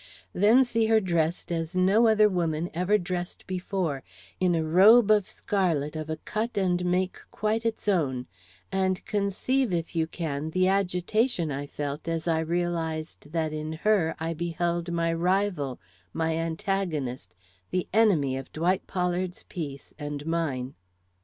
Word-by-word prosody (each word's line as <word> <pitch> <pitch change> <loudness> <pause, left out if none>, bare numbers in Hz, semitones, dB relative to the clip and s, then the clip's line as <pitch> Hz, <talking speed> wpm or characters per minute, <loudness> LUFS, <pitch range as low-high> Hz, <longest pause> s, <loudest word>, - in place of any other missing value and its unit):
Then 225 +7 +5
see 230 -2 +1
her 220 0 +5
dressed 170 -3 -1
as 165 0 -2
no 195 +6 +4
other 215 -1 +5
woman 170 -3 -1
ever 180 +5 +2
dressed 180 -1 -4
before, 185 -6 -2 0.4
in 180 -2 +3
a 160 - +1
robe 200 +8 +6
of 210 -3 +4
scarlet 165 -7 -1
of 155 0 -5
a 160 - -1
cut 215 +7 -3
and 180 -2 +1
make 180 +1 0
quite 220 +2 -1
its 220 -1 -4
own, 140 -10 +1 0.5
and 190 -1 0
conceive, 210 +5 0
if 170 -1 -2
you 160 -1 +1
can, 155 -3 -3
the 185 +3 +2
agitation 190 - +1
I 140 +1 -4
felt 145 +2 -5
as 165 0 -2
I 165 -1 +2
realized 160 -2 -2
that 160 -2 -1
in 155 +1 -4
her 170 -1 +1
I 165 +1 -2
beheld 170 +1 -2
my 165 -1 +1
rival, 175 -6 0 0.3
my 160 0 0
antagonist, 160 - -2 0.3
the 185 -1 -1
enemy 170 -12 +3
of 135 - -8
Dwight 175 +4 0
Pollard's 180 0 -2
peace 145 -6 -6
and 145 -1 -5
mine. 145 -6 -2
175 Hz, 150 wpm, -27 LUFS, 160-195 Hz, 0.5 s, robe